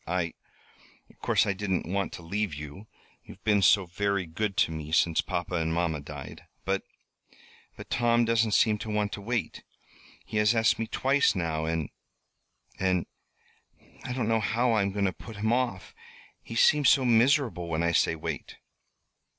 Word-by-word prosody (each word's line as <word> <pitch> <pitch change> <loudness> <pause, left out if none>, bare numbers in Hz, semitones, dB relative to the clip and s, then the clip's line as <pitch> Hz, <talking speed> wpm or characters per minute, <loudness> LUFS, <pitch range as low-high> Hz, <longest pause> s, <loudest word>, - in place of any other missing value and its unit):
"I 85 -1 -1 0.8
of - - -28
course - - +2
I 100 - 0
didn't 95 -2 -2
want 100 +3 -2
to 85 - -9
leave 100 -1 -2
you 75 +8 -9 0.4
you've - - -14
been 105 -2 +3
so 95 +3 +5
very 100 +1 -1
good 100 +5 -3
to - - +3
me 80 -1 -6
since 80 0 +3
papa 90 0 -4
and 80 -2 0
mamma 80 -2 0
died. 70 -1 -9 0.2
But 95 0 0 1.0
but - - -11
Tom 120 0 +3
doesn't 115 -2 +2
seem 105 -2 +3
to 110 - -6
want 105 -1 0
to 100 - -6
wait. 115 +3 -3 0.6
He 110 - -4
has 105 +2 +3
asked 115 0 +3
me 115 - -2
twice 140 +1 +2
now 80 -3 -1
and 80 -2 -2 0.9
and 95 -2 +1 1.0
I 130 - -5
don't 125 -4 -1
know 115 0 +2
how 115 +3 +1
I 110 -2 +3
am 100 0 0
going 100 0 -1
to 95 - 0
put 110 - -11
him 110 +3 0
off. 120 -7 -2 0.5
He 115 - -9
seems 145 +3 +5
so 135 - +4
miserable 120 - +3
when 85 0 -1
I 85 - +2
say 80 - +2
wait." 80 - -6
100 Hz, 175 wpm, -28 LUFS, 85-115 Hz, 1.0 s, so